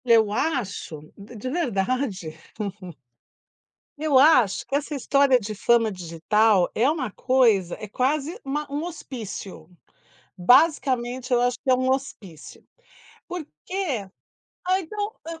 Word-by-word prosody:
Eu 225 -3 +4
acho 205 - -3
d 205 +4 -12
de 230 +4 -5
verdade 235 - -2 1.6
Eu 300 -3 +2
acho 260 -8 +5
que 275 - -3
essa 290 +1 -2
história 275 -1 +3
de 215 -1 -5
fama 230 +1 +2
digital 185 +3 +2
é 245 +5 +2
uma 285 -8 -2
coisa 225 -8 +2
é 215 - -7
quase 290 - -1
uma 295 +2 -3
um 290 +2 -2
hospício. 220 - -8 0.7
Basicamente, 255 - +2
eu 245 - +4
acho 245 0 +1
que 270 - 0
é - - +6
um 255 +1 0
hospício, 220 - -5 0.6
porque 310 - -4 0.6
ah, 370 +1 +2
então 410 +4 -4
eu 330 0 -7
255 Hz, 125 wpm, -24 LUFS, 205-290 Hz, 1.6 s, é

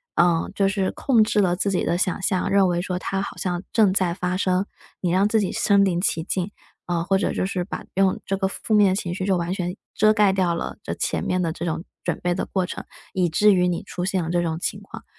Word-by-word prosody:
呃， 170 -1 +3
就 195 -1 +2
是 195 -1 0
控 250 -5 +2
制 215 - +1
了 180 -2 +2
自 200 - 0
己 190 - 0
的 170 - 0
想 185 +1 -1
象， 190 -1 0
认 195 -1 +4
为 175 0 0
说 180 0 -3
它 195 +1 -2
好 200 - -5
像 175 -1 -2
正 205 -5 +4
在 185 -3 +1
发 180 0 -2
生。 185 0 +1 0.4
你 175 -2 0
让 190 +3 +3
自 220 +1 +2
己 195 - -1
身 200 -1 +3
临 175 -2 0
其 165 -3 0
境， 185 +2 -2 0.4
呃， 170 -1 -1
或 195 0 +2
者 - - 0
就 - - -1
是 185 -2 -2
把 190 - -7
用 190 0 +2
这 195 - -1
个 190 0 -1
负 215 - -4
面 205 -3 +5
情 175 -3 -3
绪 185 - -3
就 190 -2 +2
完 170 +1 -2
全 180 0 -3 0.2
遮 215 +1 +5
盖 205 -2 +4
掉 185 -3 +1
了 170 - -4
这 - - -3
前 - - -2
面 185 0 0
的 165 -2 -1
这 170 - -7
种 165 +1 -3 0.2
准 175 - -2
备 175 0 0
的 - - -2
过 190 -2 -1
程， - - -6 0.3
以 180 -3 +1
至 210 +6 +4
于 180 -1 +3
你 175 - -2
出 180 - -5
现 190 0 0
了 160 - -4
这 175 0 +1
种 165 -1 -2
情 - - -3
况。 - - -11
185 Hz, 280 characters per minute, -23 LUFS, 175-195 Hz, 0.4 s, 面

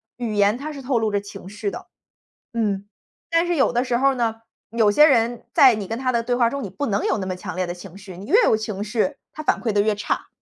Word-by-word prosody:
语 235 -3 -4
言 205 +2 +3
它 295 +4 -6
是 285 -2 -8
透 255 -2 0
露 220 -1 0
着 205 - +1
情 195 -2 -10
绪 210 0 -4
的。 - - -9 0.7
嗯， 205 -3 -1 0.4
但 335 +1 +2
是 350 - +1
有 270 - +3
的 245 +1 0
时 245 - 0
候 270 +1 +3
呢， 230 -3 0 0.4
有 225 -3 +3
些 300 +9 +7
人 235 -3 +1
在 260 -4 +7
你 205 -3 -5
跟 225 - -3
他 255 0 0
的 235 - +1
对 245 +1 0
话 235 -2 +3
中 280 +1 -4
你 200 - -5
不 285 +10 -4
能 200 -1 0
有 - - +1
那 190 - -3
么 185 -1 -4
强 185 0 -7
烈 185 0 -1
的 175 - -4
情 180 +1 -12
绪。 195 -3 -11
你 190 - -9
越 420 - +4
有 220 - +4
情 215 -2 -4
绪， 225 +6 -1 0.2
他 310 - -7
反 - - +1
馈 230 - 0
得 205 - +1
越 210 0 +1
差。 205 - -3
220 Hz, 295 characters per minute, -22 LUFS, 200-250 Hz, 0.7 s, 些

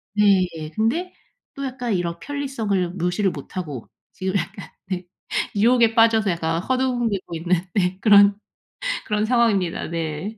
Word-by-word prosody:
네 200 -3 +4
예 155 -1 -6
근데 290 - -1 0.4
또 275 0 -4
약간 250 -4 -3
이런 170 -1 -2
편리성을 225 -11 -2
무시를 180 +2 0
못하고 145 -3 -6 0.3
지금 190 +1 -3
약간 190 +3 -5 0.2
네. 180 -2 -4 0.5
유혹에 230 +1 +4
빠져서 225 -2 +4
약간 165 -1 -1
어 - - 0
허둥대고 240 -9 -1
있는 175 +1 +1
네 185 -1 +1
그런 205 -2 +7 0.7
그런 210 0 0
상황입니다 220 -7 +1
네. 165 +6 -4
200 Hz, 290 characters per minute, -22 LUFS, 175-230 Hz, 0.7 s, 그런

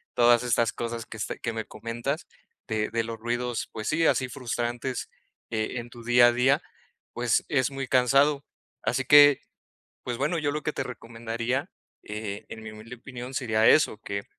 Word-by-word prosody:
todas 120 0 +5
estas 115 -2 +1
cosas 115 0 -4
que 110 - -9
este, 110 - -4
que 120 - -3
me 110 -1 -4
comentas 120 +8 -4 0.4
de 110 -1 -1
de 115 0 0
los 115 0 -5
ruidos, 120 +1 -2
pues 110 -1 -5
sí, 160 +1 +2
así 130 - +2
frustrantes, 120 0 -3 0.4
eh, 110 +2 -1
en 120 0 -8
tu 120 -1 -12
día 120 0 +7
a 120 - +5
día, 130 +3 +3 0.5
pues, 120 -2 +1
es 135 -1 +1
muy 135 0 -4
cansado. 140 +3 +3 0.4
Así 130 +2 0
que, 145 0 +8 0.6
pues 120 -1 -3
bueno, 150 +5 0
yo 145 -2 0
lo 150 +1 -3
que 150 - -1
te - - -2
recomendaría, 115 +4 -4 0.3
eh, 105 -1 -5
en 110 - -9
mi 110 - -7
humilde 110 +3 -10
opinión, 125 +1 -8
sería 110 -4 +2
eso, 150 -8 +4
que 100 -2 -4
120 Hz, 180 wpm, -27 LUFS, 115-130 Hz, 0.6 s, que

